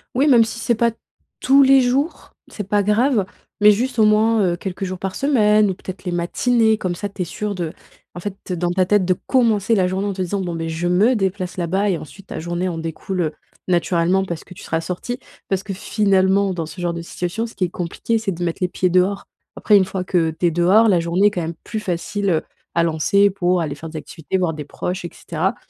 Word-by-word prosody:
Oui, 275 +4 +3
même 240 -5 +6
si 230 +1 -6
c'est 235 - +1
pas 235 +1 +2 0.5
tous 275 +2 +5
les 270 0 +6
jours, 270 +6 -1
c'est 205 -3 -7
pas 205 0 +2
grave 215 +1 +2 0.4
mais 210 - +8
juste, 240 +3 -1
au - - +6
moins, 215 +1 +4
heu, 175 -1 +1
quelques 190 +1 -5
jours 185 -1 -4
par 190 -1 -4
semaine 215 -7 +3
ou 190 - 0
peut-être 185 0 -9
les 180 - -3
matinées 220 +6 +2
comme 185 -4 -2
ça 205 +4 -4
tu 200 -1 -7
es - - 0
sûr 210 +5 -4
de 170 -3 -3 0.4
en - - -7
fait, 195 0 -7
dans 175 0 -1
ta 185 0 +2
tête 205 0 +3
de 185 - +3
commencer 230 -4 +3
la 185 -3 +2
journée 190 +2 -2
en 200 - -1
te 190 - -4
disant: 190 +2 -2
«Bon, 175 -2 -3
beh, 165 0 -3
je 165 +2 -2
me 210 +8 +4
déplace 190 -3 -2
là-bas» 190 +4 0
et 180 - +1
ensuite 175 +6 -12
ta - - -6
journée 175 +2 -2
en 170 - -4
découle, 165 +3 -4
heu, 155 -2 -1 0.4
naturellement 175 +1 +2
parce 170 -3 -5
que - - -13
tu 185 - -13
seras 160 0 -1
sorti, 185 +9 -4 0.3
parce 195 -1 0
que 195 - -5
finalement, 195 -1 +2
dans 165 -2 -3
ce 160 +3 -10
genre 175 -1 -1
de 170 - -5
situation 180 +6 -3
ce 225 - -14
qui - - -1
est - - -4
compliqué 180 +6 -2
c'est 220 -3 -2
de 175 +1 -5
mettre 170 -1 -2
les 180 - +2
pieds 185 0 0
dehors. 185 +3 +2 0.3
Après, 210 - +4
une 190 - +3
fois 190 -1 -4
que 170 -3 +1
tu - - +1
es - - +1
dehors, 185 +7 +4
la 180 -4 +4
journée 175 +4 +2
est 210 - +2
quand 180 - -3
même 165 +1 -4
plus 220 - -4
facile, 195 +2 -2
heu, 160 -3 +2 0.3
à 170 - +3
lancer 170 +5 +3
pour 180 -2 +1
aller 145 -3 -3
faire 160 +2 -8
des 155 - -7
activités, 160 +3 -4
voir 180 -3 0
des 150 -1 -7
proches 180 +6 -4
et - - -4
cetera 180 +7 -2
190 Hz, 245 wpm, -20 LUFS, 175-210 Hz, 0.5 s, mais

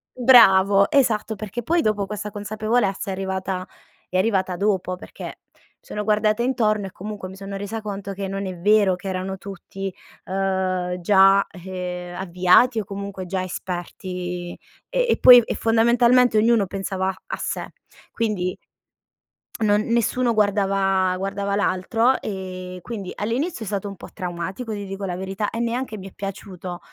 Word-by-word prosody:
Bravo, 200 -6 +6
esatto 225 -5 +2
perché 215 +3 -5
poi 335 +5 +2
dopo, 210 -2 0
questa 210 +1 -5
consapevolezza 210 -1 -1
è - - -1
arrivata 190 -1 -3 0.4
è 185 - -1
arrivata 190 -3 +1
dopo, 190 -2 0
perché - - -11 0.3
mi - - -30 0.2
sono 210 - -5
guardata 215 +1 +2
intorno 215 -5 +1
e 190 - -7
comunque 205 -1 -7
mi 190 - -10
sono 195 0 -7
resa 215 +3 -5
conto 200 -1 -5
che 195 0 -4
non 195 0 -3
è 185 -2 -5
vero 200 0 +4
che 190 +2 -7
erano 190 +1 -3
tutti, 195 0 -7 0.3
ehm, 185 -1 -1
già 195 +1 +5
ehm, 180 -1 -6
avviati 185 +6 +3
o 205 - -4
comunque 195 -1 -6
già 185 +1 -2
esperti 180 0 -5 0.3
e - - +1
poi 250 -1 +10
e - - -4
fondamentalmente 235 +1 +4
ognuno 225 -2 +4
pensava 190 0 -2
a - - -4
sé. - - -3 0.4
Quindi, 205 -6 -1 1.0
non 210 -1 +3
nessuno 235 +1 +1
guardava 195 -3 +2
guardava 200 +1 -2
l'altro 225 +6 +1
e 185 -2 -6
quindi 200 -4 -6
all'inizio 240 - -2
è - - -7
stato 200 0 -2
un 195 - -7
po' - - -11
traumatico, 185 +6 -5
ti 205 -1 -5
dico 195 +1 -5
la 180 -2 -3
verità, 195 +2 -3
e 230 - -4
neanche 235 -1 -2
mi 195 0 -8
è - - -25
piaciuto. 185 -2 -7
195 Hz, 155 wpm, -23 LUFS, 185-215 Hz, 1.0 s, poi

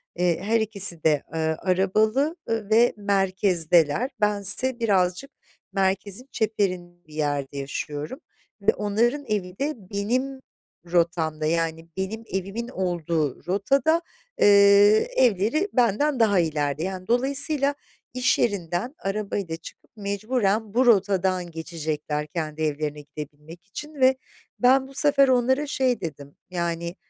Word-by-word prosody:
eee, 175 -1 +1
her 225 +2 +2
ikisi 200 -6 +3
de, 150 -3 +2
eee, 160 - -2
arabalı, 195 - +1
ııı, 225 -3 -2
ve 230 +2 +4
merkezdeler. 190 - +1
Bense 210 +5 +2
birazcık 195 +4 0 0.4
merkezin 195 +4 -1
çeperi 205 -4 0 0.3
bir 155 - -16
yerde 145 -2 -2
yaşıyorum 145 - -5 0.4
ve 200 - +3
onların 235 +7 0
evi 195 -5 -3
de 295 +2 -1
benim 230 +7 -3 0.5
rotamda, 165 -3 0
yani 165 0 -1
benim 215 +4 -4
evimin 195 +5 -4
olduğu 170 - -2
rotada, 275 - +2 0.4
eee, 200 +1 +6
evleri 245 - +2
benden 250 +4 +2
daha 205 -4 +4
ileride. 150 -2 -1
Yani, 185 0 -5
dolayısıyla 280 +3 +1 0.4
iş 255 0 +1
yerinden 200 - -1
arabayla 195 -4 -3
çıkıp - - -14
mecburen 210 +1 -1
bu 255 +2 +3
rotadan 190 -5 +2
geçecekler 155 -2 -4
kendi 155 -1 -5
evlerine 150 -1 -2
gidebilmek 150 +3 -11
için 295 +9 -9
ve 260 -1 +4 0.4
ben 265 +2 +4
bu 275 - -14
sefer 285 -1 +5
onlara 260 +3 +2
şey 255 -5 0
dedim: 145 -4 -7
Yani, 170 -1 -3
195 Hz, 120 wpm, -24 LUFS, 165-240 Hz, 0.5 s, eee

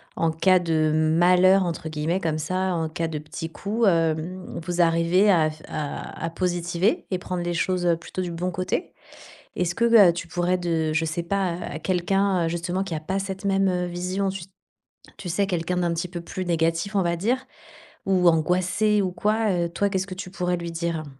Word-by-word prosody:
«en 165 -1 +1
cas 185 +3 +4
de 155 -2 +1
malheur» 180 +4 +4
entre 165 -2 -4
guillemets 160 +5 -1
comme 155 -2 -1
ça, 185 +4 -1
en 165 -1 -1
cas 165 0 -3
de 155 - -4
petits 160 +2 -7
coups, 215 +6 -1
hem, 165 +1 0
vous 175 0 -3
arrivez 170 +4 +4
à 160 -4 +4
f 155 0 -14
à 150 +2 -5
à 165 - -1
positiver 175 +3 0
et 185 - +1
prendre 180 -1 -4
les 175 0 -2
choses, 180 +1 0
heu, 170 -1 +3
plutôt 175 +2 -6
du 175 -1 -3
bon 175 +2 -2
côté. 185 - -3 0.6
Est-ce 175 -1 0
que, 235 - +1 0.2
heu, - - +5
tu 170 0 -6
pourrais 175 +2 0
de 165 -3 -1
je 160 +1 +1
sais 165 +2 -2
pas, 190 0 0
à 170 -3 -6
quelqu'un, 185 0 +1
heu, - - -1
justement 175 +3 -2
qui 175 -5 -4
a - - -2
pas 190 +5 -3
cette 195 0 -5
même, 195 0 +2
heu, 180 -1 0
vision, 180 +3 -2
tu 190 -2 -4 0.7
tu 185 - -7
sais, 200 +3 +1
quelqu'un 180 -1 -2
d'un 175 -1 0
petit 170 +2 -3
peu 175 -1 -6
plus 185 +2 -5
négatif 165 +3 0
on - - +4
va 170 0 0
dire 250 +9 -1 0.6
ou 185 -2 +3
angoissé 185 +6 +2
ou 185 -2 -1
quoi, 215 +3 +1
heu, 170 -1 0
toi, 200 +4 0
qu'est-ce 190 -1 -1
que 185 - -5
tu 185 0 -7
pourrais 180 -1 -1
lui 170 0 -5
dire? 165 -1 -2
175 Hz, 210 wpm, -24 LUFS, 165-185 Hz, 0.7 s, heu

